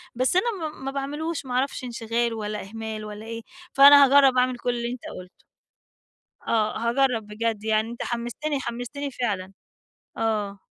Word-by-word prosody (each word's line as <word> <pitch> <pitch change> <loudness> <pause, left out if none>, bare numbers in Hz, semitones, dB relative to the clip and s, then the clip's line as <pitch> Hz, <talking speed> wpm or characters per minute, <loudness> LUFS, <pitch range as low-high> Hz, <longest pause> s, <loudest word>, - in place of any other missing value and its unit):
بس 255 +7 +1
أنا 375 - +3 0.2
ما 315 - -2
ما 270 +1 -4
باعملوش، 290 +3 -3
ما 250 - -5
أعرفش 260 +1 -1
انشغال، 235 -1 -1
والّا 210 -1 -4
إهمال، 220 0 -6
والّا 210 +1 -8
إيه؟ 230 0 -6 0.3
فأنا 280 +1 +9
هاجرّب 270 -1 +5
أعمل 250 0 +2
كل 245 - -3
اللي 235 0 -3
أنت 250 - -7 0.2
قُلته. 180 0 -15 1.0
آه 215 -1 +1
هاجرب 235 -1 +1
بجد، 215 0 -3
يعني 220 +1 +1
أنت 235 - -6
حمستني 240 +5 -3
حمستني 245 +4 -5
فعلًا. 200 -7 -3 0.6
آه، 210 -3 -1
235 Hz, 155 wpm, -25 LUFS, 220-270 Hz, 1.0 s, فأنا